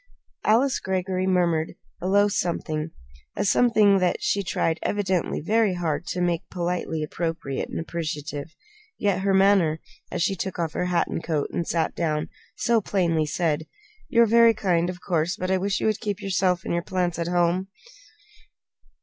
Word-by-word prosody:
Alice 255 +5 +3
Greggory 185 0 -1
murmured 170 -4 +1 0.3
a 180 - -2
low 205 +2 +4
something 165 -5 -2 0.5
a 200 - -1
something 210 -2 +4
that 180 -1 +1
she 200 - 0
tried, 165 -3 -1
evidently, 190 -4 -1
very 210 +2 +2
hard 170 -1 -2
to 180 - -3
make 175 -2 +1
politely 175 -3 -2
appropriate 160 -3 -3
and - - -4
appreciative. 155 -2 -5 0.4
Yet 200 -3 +1
her 195 0 +2
manner, 190 -5 +4 0.3
as - - -1
she 195 - +1
took 190 +1 -4
off 165 -3 -2
her 180 - -1
hat 180 -1 +1
and - - -4
coat 155 -3 -1
and 170 - -2
sat 165 -2 0
down, 155 -3 -1 0.3
so 230 -1 +2
plainly 170 -6 +1
said: 160 -1 -1 0.4
"You 235 -3 +5
are - - +5
very 230 0 +5
kind, 175 -4 +1
of 180 0 -7
course, 175 -1 0
but 185 +1 -3
I 190 - +2
wish 200 +1 0
you - - -2
would 215 -1 +1
keep 205 -4 -2
yourself 185 -2 0
and - - -2
your 170 - +1
plants 175 -1 -2
at 170 - -1
home!" 175 +1 +1
180 Hz, 175 wpm, -25 LUFS, 165-195 Hz, 0.5 s, You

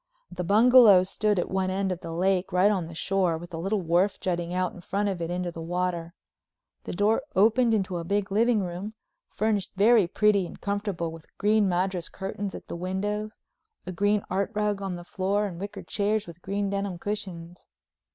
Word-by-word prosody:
The 180 - -4
bungalow 215 -1 +7
stood 205 +2 0
at 175 - -1
one 190 0 0
end 190 0 -1
of 180 - -3
the 165 - -7
lake 185 +2 0
right 185 +3 +4
on 185 -5 -1
the 165 - -10
shore, 185 -2 0
with 175 +2 -11
a 165 - -4
little 195 +4 -1
wharf 175 +4 +2
jutting 175 -2 -2
out 180 0 -1
in 180 - -11
front 200 +3 -1
of 185 -3 -4
it 165 - -2
into 180 0 -2
the 165 - -8
water. 175 0 -2 0.7
The - - -5
door 205 +4 +2
opened 230 +4 +4
into 190 -3 -1
a - - -4
big 200 +3 -1
living 220 0 +3
room, 185 +5 -6 0.3
furnished 210 -3 -1
very 210 -1 +5
pretty 200 0 +2
and - - -12
comfortable 200 -5 -2
with 165 -1 -12
green 210 -1 +3
madras 180 -1 -1
curtains 195 +1 -5
at - - -9
the - - -5
windows, 205 +4 -3 0.5
a - - -4
green 205 +3 +1
art 190 +2 -1
rug 210 -1 0
on 190 -2 -3
the 175 - -8
floor, 195 +3 0
and 175 -4 -6
wicker 200 +2 -6
chairs 210 +1 -1
with 170 +1 -12
green 200 +1 -2
denim 200 -2 -2
cushions. 180 -3 -6
190 Hz, 200 wpm, -27 LUFS, 175-205 Hz, 0.7 s, bungalow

